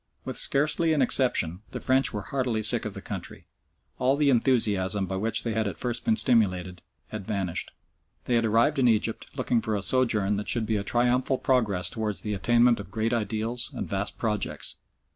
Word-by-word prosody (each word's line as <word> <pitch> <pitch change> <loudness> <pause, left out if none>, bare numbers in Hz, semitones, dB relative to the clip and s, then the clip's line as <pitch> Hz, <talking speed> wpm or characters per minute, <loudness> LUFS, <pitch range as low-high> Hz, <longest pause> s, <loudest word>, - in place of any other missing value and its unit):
With - - -4
scarcely 150 +3 +3
an 150 - +1
exception, 100 -10 +2
the - - -4
French 130 +1 +1
were 105 -2 -5
heartily 125 -3 -2
sick 105 - +3
of - - -5
the - - -9
country. - - -7 0.5
All 130 +2 +2
the 145 -2 +3
enthusiasm 105 -6 +1
by 95 - -5
which 110 +3 -1
they 115 - -2
had 110 -1 -1
at 95 - -5
first 120 -2 -3
been 225 - +3
stimulated 95 - +1 0.3
had 105 -2 -7
vanished. 95 -5 -3 0.5
They 125 - -1
had 115 -1 +2
arrived 115 +7 +2
in 125 - +3
Egypt, 110 -1 0
looking 125 -3 0
for 110 -2 -2
a 100 - -2
sojourn 110 -5 +2
that 105 - -4
should 115 -2 +3
be 110 -1 -1
a 100 - -3
triumphal 125 +4 +1
progress 110 -10 +1
towards 110 -3 -2
the 105 - -3
attainment 120 +4 +3
of 100 - -9
great 110 +3 -2
ideals 115 +2 -2
and - - -4
vast 100 +1 -3
projects. 105 -2 -2
115 Hz, 195 wpm, -26 LUFS, 105-125 Hz, 0.5 s, scarcely